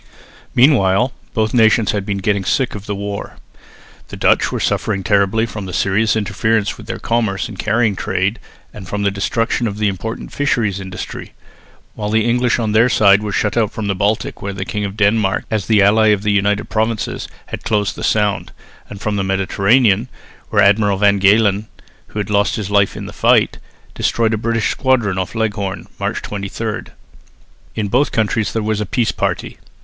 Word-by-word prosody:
Meanwhile 120 -3 +4 0.2
both 110 -1 0
nations 110 -2 +4
had 100 -1 -3
been 100 -1 -1
getting 100 0 0
sick 130 +6 0
of 105 0 -8
the 105 - -2
war. 100 0 -6 0.7
The - - -9
Dutch - - +2
were - - -2
suffering 100 -2 -1
terribly 100 +2 +2
from 105 -3 -7
the 90 - -7
serious 105 +3 +1
interference 110 +1 0
with 110 - -13
their 115 0 -4
commerce 110 -5 -1
and 100 - -10
carrying 110 -1 +1
trade 95 +4 -1 0.3
and 95 -3 -10
from 105 +2 -3
the 100 - +2
destruction 115 +4 -1
of 100 -1 -5
the 105 0 +1
important 100 +4 -5
fisheries 115 -9 0
industry, 95 -1 -7 0.6
while 105 -1 -4
the 110 +1 +2
English 120 +1 +2
on 110 -3 -1
their 110 +3 +4
side 100 -3 +5
were 105 -1 -3
shut 105 +1 0
out 110 -2 +1
from 110 - -5
the 100 - 0
Baltic, 100 +3 -1
where 100 -1 -4
the 95 0 -5
King 105 0 -3
of 100 +1 -6
Denmark, 105 -1 +2
as 105 -4 -1
the 105 -3 +4
ally 110 +2 +4
of 105 -2 +2
the 105 - +1
United 100 +1 +1
Provinces, 110 0 -2 0.2
had - - -7
closed 105 -2 0
the - - -7
Sound, 105 -2 0 0.4
and 100 - -8
from 105 0 -2
the 95 - 0
Mediterranean, 100 +4 +2 0.4
where 105 -3 +3
Admiral 100 0 +3
van 100 0 +3
Galen, 100 +1 +3 0.4
who 105 - -3
lost 100 0 +1
his 105 -3 -4
life 100 -1 +2
in - - -6
the - - -8
fight, - - +2 0.3
destroyed 115 -1 0
a - - +1
British 115 0 0
squadron 120 -8 +1
off 95 +4 -4
Leghorn 105 -4 -2
(March - - -2
23). 105 +2 -4 0.9
In 105 -2 -1
both 125 +8 +1
countries 110 -1 0
there 110 - -2
was 105 0 -1
a 105 - -3
peace 120 +2 0
party. - - -3
105 Hz, 185 wpm, -18 LUFS, 100-110 Hz, 0.9 s, side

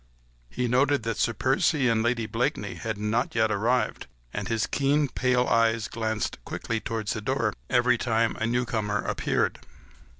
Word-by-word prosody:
He 125 - -2
noted 135 +2 +2
that 115 -1 -2
Sir 120 - +2
Percy 135 +4 +2
and 115 -2 +2
Lady 115 0 0
Blakeney 105 - -1
had 110 -2 -4
not 105 +4 -1
yet 110 -1 +2
arrived, 115 +5 0 0.3
and 105 - -3
his 115 -2 0
keen, 145 +1 +1
pale 125 -1 +1
eyes 115 -1 +2
glanced 110 -3 -3
quickly 115 -1 -3
towards 110 -2 -3
the 110 - -4
door 115 -2 0 0.2
every 125 -1 +3
time 115 -2 +1
a 110 - -1
newcomer 110 -4 -1
appeared. - - 0
115 Hz, 160 wpm, -26 LUFS, 110-125 Hz, 0.3 s, every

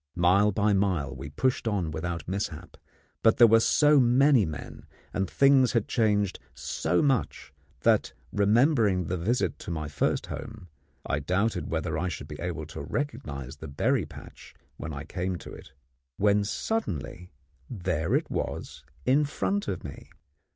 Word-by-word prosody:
Mile 95 +4 +4
by 105 +1 +2
mile 90 -9 0
we 65 +2 -7
pushed 125 - 0
on 95 -7 -1
without 85 0 -4
mishap, 95 -4 -4 0.5
but 115 - +4
there 120 - +9
were 115 0 +6
so 150 +5 +4
many 125 - +4
men, 75 -2 -8 0.3
and 95 -1 -1
things 135 - +4
had 115 -4 +1
changed 105 -4 +1 0.2
so 85 +2 0
much 135 -6 -1 0.3
that, - - +3 0.2
remembering 105 - +3
the 90 - -2
visit 110 +9 -1
to - - -9
my 80 -3 -3
first 75 - 0
home, 110 -6 -8 0.4
I 70 - -1
doubted 95 +9 -1
whether 80 -1 -2
I 90 - -1
should 85 - -5
be - - -8
able 85 -3 -4
to 80 - -8
recognise 70 - -4
the 80 - -8
berry 70 0 0
patch - - -13 0.2
when - - -6
I - - -6
came 90 +1 -3
to - - -10
it; - - -12 0.5
when 100 0 +3
suddenly 90 - -3 0.4
there 90 -7 -1
it - - -1
was - - -4 0.2
in 140 +3 +4
front 200 +7 -2
of 95 - -3
me! 70 - -9
95 Hz, 160 wpm, -27 LUFS, 80-115 Hz, 0.5 s, there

